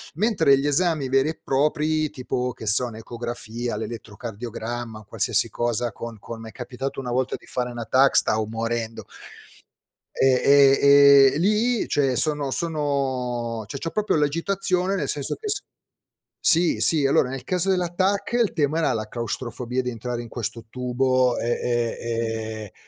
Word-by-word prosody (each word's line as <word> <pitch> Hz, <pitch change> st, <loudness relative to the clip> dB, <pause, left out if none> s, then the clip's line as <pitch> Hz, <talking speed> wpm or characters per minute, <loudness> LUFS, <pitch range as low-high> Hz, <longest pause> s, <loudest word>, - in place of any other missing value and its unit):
Mentre 190 Hz, -8 st, +3 dB
gli 145 Hz, -, -1 dB
esami 155 Hz, -2 st, +1 dB
veri 135 Hz, +3 st, +2 dB
e 160 Hz, -, -6 dB
propri, 150 Hz, +2 st, 0 dB
tipo 125 Hz, 0 st, -3 dB
che 115 Hz, -, -10 dB
so, 120 Hz, +4 st, +4 dB
un'ecografia, 120 Hz, +1 st, -6 dB
l'elettrocardiogramma, 115 Hz, 0 st, -6 dB
qualsiasi -, -, +1 dB
cosa 120 Hz, -1 st, -1 dB
con 115 Hz, -1 st, -8 dB
con 115 Hz, +1 st, -9 dB
m'è 110 Hz, -1 st, -9 dB
capitato 130 Hz, +2 st, -6 dB
una 125 Hz, -2 st, -4 dB
volta 130 Hz, +1 st, -1 dB
di -, -, -20 dB
fare 125 Hz, -1 st, -3 dB
una 120 Hz, -1 st, -6 dB
TAC, 135 Hz, +5 st, +4 dB
stavo 110 Hz, 0 st, +3 dB
morendo. 115 Hz, 0 st, -4 dB, 1.1 s
E 135 Hz, -, +4 dB
e 140 Hz, -1 st, +6 dB
e 140 Hz, -1 st, +7 dB
e -, -, -2 dB
lì 215 Hz, +5 st, +1 dB
cioè 135 Hz, -3 st, +1 dB
sono 145 Hz, -1 st, +1 dB
sono 130 Hz, -7 st, -2 dB
cioè 140 Hz, -, -6 dB
c'ho 165 Hz, -, -2 dB
proprio 215 Hz, 0 st, 0 dB
l'agitazione 180 Hz, +5 st, 0 dB
nel 195 Hz, -, -2 dB
senso 145 Hz, -2 st, -2 dB
che 430 Hz, -1 st, -6 dB
s 400 Hz, -1 st, +1 dB, 0.8 s
sì, 170 Hz, +1 st, +3 dB
sì. 150 Hz, -4 st, +5 dB
Allora 130 Hz, -2 st, +2 dB
nel 130 Hz, 0 st, -6 dB
caso 185 Hz, +1 st, 0 dB
della 180 Hz, -2 st, 0 dB
TAC, 195 Hz, +5 st, -1 dB
il 220 Hz, -, 0 dB
tema 155 Hz, 0 st, 0 dB
era 165 Hz, -, +1 dB
la 110 Hz, -1 st, -3 dB
claustrofobia 120 Hz, +1 st, -4 dB
di 125 Hz, -, -3 dB
entrare 120 Hz, +1 st, -5 dB
in 120 Hz, -, -10 dB
questo 115 Hz, 0 st, -5 dB
tubo 125 Hz, 0 st, +1 dB
e 115 Hz, -, -3 dB
e 120 Hz, -1 st, -1 dB, 0.7 s
e -, -, -36 dB
130 Hz, 160 wpm, -23 LUFS, 120-155 Hz, 1.1 s, e